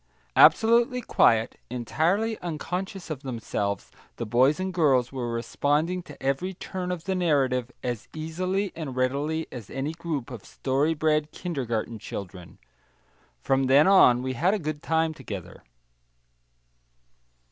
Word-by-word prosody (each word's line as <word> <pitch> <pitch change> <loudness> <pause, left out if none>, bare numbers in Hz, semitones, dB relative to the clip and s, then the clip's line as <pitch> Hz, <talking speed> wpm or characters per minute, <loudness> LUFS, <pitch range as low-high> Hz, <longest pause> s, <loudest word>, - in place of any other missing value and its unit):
Absolutely 235 +2 +5
quiet, 115 - +3
entirely 165 - 0
unconscious 180 +3 -4
of 140 -4 -4
themselves, 110 -6 -3 0.2
the 115 - -4
boys 130 +8 +3
and 185 0 -2
girls 135 -8 +3
were 125 -3 -3
responding 145 +9 0
to 150 -5 -13
every 155 +8 -1
turn 180 0 -5
of 175 -3 -4
the 190 - -1
narrative 135 -8 +1
as 120 -3 -3
easily 185 +5 -2
and 150 -6 -5
readily 145 +5 0
as 115 -6 -8
any 135 +3 -3
group 155 -7 -4
of 115 -5 -8
story 140 +4 0
bred 150 0 +1
kindergarten 120 -10 -3
children. 90 -4 -8 0.9
From 135 0 +2
then 140 +3 +6
on 125 -11 +6
we 130 0 -2
had 175 - +2
a - - 0
good 155 -4 -4
time 160 0 +1
together. 100 - -8
145 Hz, 135 wpm, -26 LUFS, 125-175 Hz, 0.9 s, then